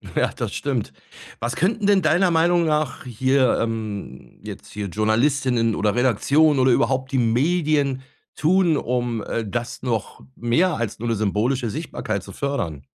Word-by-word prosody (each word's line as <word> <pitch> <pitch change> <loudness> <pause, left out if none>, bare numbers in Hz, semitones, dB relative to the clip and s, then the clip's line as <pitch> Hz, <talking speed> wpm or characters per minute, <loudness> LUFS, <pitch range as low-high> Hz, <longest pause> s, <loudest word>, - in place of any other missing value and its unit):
Ja, - - +2
das - - -5
stimmt. 125 - -3 0.5
Was 120 +1 -3
könnten 205 +4 0
denn 200 -2 +4
deiner 175 +3 +3
Meinung 170 +1 +3
nach 155 -3 -1
hier 130 +1 +1
ähm, 110 - -5
jetzt - - -9
hier 105 -1 -5
Journalistinnen 115 - +1
oder 105 0 +1
Redaktionen 135 +5 +3
oder 130 0 +4
überhaupt 130 +3 +1
die 135 - 0
Medien 140 +3 +1 0.3
tun, 170 -1 +3
um, 120 -3 -2
äh, 115 - -2
das 120 +3 -4
noch 115 -5 -3 0.2
mehr 155 +10 +1
als 115 -2 -4
nur 120 - -3
'ne 115 - +1
symbolische 110 +4 0
Sichtbarkeit 110 - -4
zu 100 - -10
fördern? 85 - -3
125 Hz, 155 wpm, -22 LUFS, 115-150 Hz, 0.5 s, denn